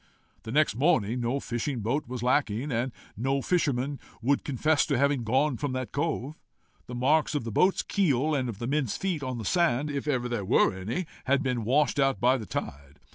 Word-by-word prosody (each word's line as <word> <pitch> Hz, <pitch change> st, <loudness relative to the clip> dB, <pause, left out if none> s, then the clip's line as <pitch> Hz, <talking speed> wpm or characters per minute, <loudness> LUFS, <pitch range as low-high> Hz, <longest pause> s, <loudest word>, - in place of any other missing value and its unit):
The 110 Hz, -, -7 dB
next 150 Hz, -4 st, +3 dB
morning 125 Hz, -, +2 dB
no 120 Hz, +4 st, 0 dB
fishing 120 Hz, 0 st, -3 dB
boat 125 Hz, +7 st, -1 dB
was 125 Hz, -1 st, -5 dB
lacking, 125 Hz, 0 st, +1 dB
and 120 Hz, +2 st, -1 dB, 0.2 s
no 135 Hz, +5 st, 0 dB
fisherman 140 Hz, -6 st, 0 dB, 0.2 s
would 135 Hz, +4 st, +1 dB
confess 150 Hz, +3 st, +2 dB
to 140 Hz, -4 st, +1 dB
having 140 Hz, -1 st, +2 dB
gone 130 Hz, +4 st, +1 dB
from 145 Hz, 0 st, -3 dB
that 130 Hz, -1 st, -3 dB
cove. 150 Hz, -1 st, -2 dB, 0.5 s
The 125 Hz, -, -6 dB
marks 150 Hz, +5 st, +2 dB
of 145 Hz, -, -1 dB
the 115 Hz, -, -5 dB
boat's 185 Hz, -, +3 dB
keel, 155 Hz, -, +1 dB
and 130 Hz, -4 st, 0 dB
of 110 Hz, -, -6 dB
the 120 Hz, -, -4 dB
men's 135 Hz, -3 st, 0 dB
feet, 185 Hz, -6 st, -2 dB
on 130 Hz, -2 st, -3 dB
the 110 Hz, -, -6 dB
sand, 150 Hz, -, +1 dB
if 140 Hz, +1 st, -4 dB
ever 125 Hz, -4 st, 0 dB
there 120 Hz, -4 st, -2 dB
were 95 Hz, -, +3 dB
any, 110 Hz, -, -3 dB, 0.2 s
had 140 Hz, +2 st, +2 dB
been 125 Hz, -4 st, -1 dB
washed 145 Hz, +4 st, +2 dB
out 135 Hz, -6 st, +2 dB
by 125 Hz, +3 st, +4 dB
the 110 Hz, -, -7 dB
tide. 70 Hz, +1 st, -6 dB
130 Hz, 205 wpm, -28 LUFS, 120-145 Hz, 0.5 s, by